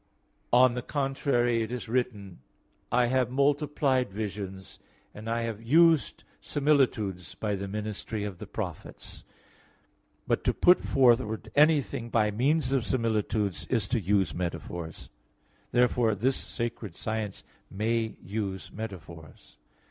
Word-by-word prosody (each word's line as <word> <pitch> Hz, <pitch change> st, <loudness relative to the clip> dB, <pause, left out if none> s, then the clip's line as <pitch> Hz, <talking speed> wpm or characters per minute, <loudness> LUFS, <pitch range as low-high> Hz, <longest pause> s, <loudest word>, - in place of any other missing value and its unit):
On 125 Hz, 0 st, +6 dB
the 125 Hz, -, -3 dB
contrary, 135 Hz, -4 st, 0 dB
It 110 Hz, +1 st, -3 dB
is 125 Hz, -2 st, -5 dB
written 110 Hz, -6 st, -2 dB, 0.5 s
(Osee 125 Hz, +2 st, +4 dB
12:10): -, -, +4 dB
"I -, -, +3 dB
have 125 Hz, 0 st, +1 dB
multiplied 140 Hz, -2 st, +1 dB
visions, 100 Hz, -2 st, -6 dB, 0.3 s
and 110 Hz, +2 st, -7 dB
I 115 Hz, 0 st, 0 dB
have 115 Hz, -2 st, -4 dB
used 160 Hz, +5 st, +4 dB, 0.2 s
similitudes 120 Hz, -, 0 dB
by 105 Hz, -2 st, -2 dB
the 100 Hz, 0 st, -4 dB
ministry 105 Hz, +1 st, -4 dB
of 100 Hz, -4 st, -5 dB
the -, -, -8 dB
prophets." -, -, -7 dB, 1.0 s
But -, -, 0 dB
to -, -, +2 dB
put 180 Hz, +1 st, +6 dB
forward 120 Hz, -4 st, +2 dB
anything 145 Hz, -5 st, +3 dB
by 110 Hz, -2 st, +2 dB
means 140 Hz, +8 st, +1 dB
of 135 Hz, -3 st, +2 dB
similitudes 105 Hz, -, -1 dB
is 115 Hz, -5 st, 0 dB
to 125 Hz, -, +1 dB
use 95 Hz, +1 st, +1 dB
metaphors. 85 Hz, -1 st, -5 dB, 0.6 s
Therefore 120 Hz, -2 st, +3 dB
this 130 Hz, +6 st, +1 dB
sacred 115 Hz, -6 st, -5 dB
science 110 Hz, -2 st, -4 dB, 0.3 s
may 110 Hz, +2 st, -1 dB
use 100 Hz, -1 st, -4 dB
metaphors. 85 Hz, -7 st, -10 dB
115 Hz, 130 wpm, -28 LUFS, 100-130 Hz, 1.0 s, On